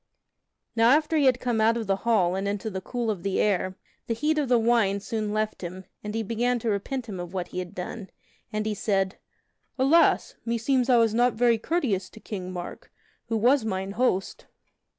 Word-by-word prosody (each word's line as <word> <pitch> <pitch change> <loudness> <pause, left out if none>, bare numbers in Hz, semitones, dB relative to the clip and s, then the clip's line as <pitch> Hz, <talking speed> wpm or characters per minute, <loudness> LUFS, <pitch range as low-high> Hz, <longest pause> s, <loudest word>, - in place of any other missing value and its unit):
Now 230 0 +5
after 305 +4 +3
he 295 -3 +3
had 255 -1 +4
come 240 -3 0
out 225 +2 +4
of 230 - -3
the 195 -1 +1
hall 195 -5 +2
and 195 +1 -2
into 205 +2 -3
the 190 -1 -4
cool 235 +1 -2
of 195 -5 -5
the 195 +1 -1
air, 185 -2 +1 0.3
the 230 - 0
heat 305 +5 +1
of 280 -4 -1
the 245 - +5
wine 225 -4 +2
soon 215 +1 -3
left 215 0 -2
him, 185 +1 -7 0.2
and 210 +1 -5
he 225 - -1
began 240 +3 0
to 230 -1 -1
repent 240 +6 -3
him 200 -5 -6
of 175 +1 -7
what 180 -2 -3
he 180 - -4
had 180 -1 -6
done; 190 +3 -6 0.4
and 215 0 -2
he 215 - 0
said: 195 -2 -1 0.6
"Alas! 280 +6 +3
meseems 240 +3 0
I 245 - +6
was 225 -2 +3
not 240 +1 +3
very 235 0 +3
courteous 220 - -1
to - - -14
King 185 -4 -6
Mark, 175 -1 -8 0.4
who 225 -1 0
was 245 +4 +4
mine 190 -2 -3
host." 200 -4 -1
220 Hz, 210 wpm, -26 LUFS, 195-240 Hz, 0.6 s, I